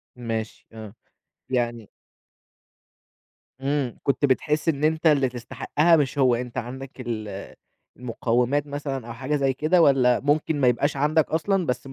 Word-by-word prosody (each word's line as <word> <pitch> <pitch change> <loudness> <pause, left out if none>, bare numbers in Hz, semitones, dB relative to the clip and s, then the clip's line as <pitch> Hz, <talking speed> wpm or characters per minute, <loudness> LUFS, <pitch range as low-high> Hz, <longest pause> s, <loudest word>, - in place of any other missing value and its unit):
ماشي، 115 -2 -5
آه، 110 -2 -9 0.6
يعني 120 -3 -2 1.7
امم 135 -3 -1
كنت 140 +1 +1
بتحس 150 +4 +1
إن 145 -2 -1
أنت 160 +1 +1
اللي 140 -4 +4
تستحقّها 145 +7 +1
مش 145 -1 0
هو، 125 -3 +4
أنت 125 +1 -6
عندك 130 +2 -6
ال 110 -5 -6 0.4
المقوّمات 125 +3 0
مثلًا 140 -4 -5
أو 115 - -6
حاجة 130 +5 -2
زي 135 -2 +1
كده 160 +6 +2
والّا 130 -5 +4
ممكن 145 +1 0
ما 125 - +4
يبقاش 135 +4 +1
عندك 150 +2 +2
أصلًا 180 +4 +1
بس 125 -1 -3
135 Hz, 140 wpm, -24 LUFS, 120-150 Hz, 1.7 s, اللي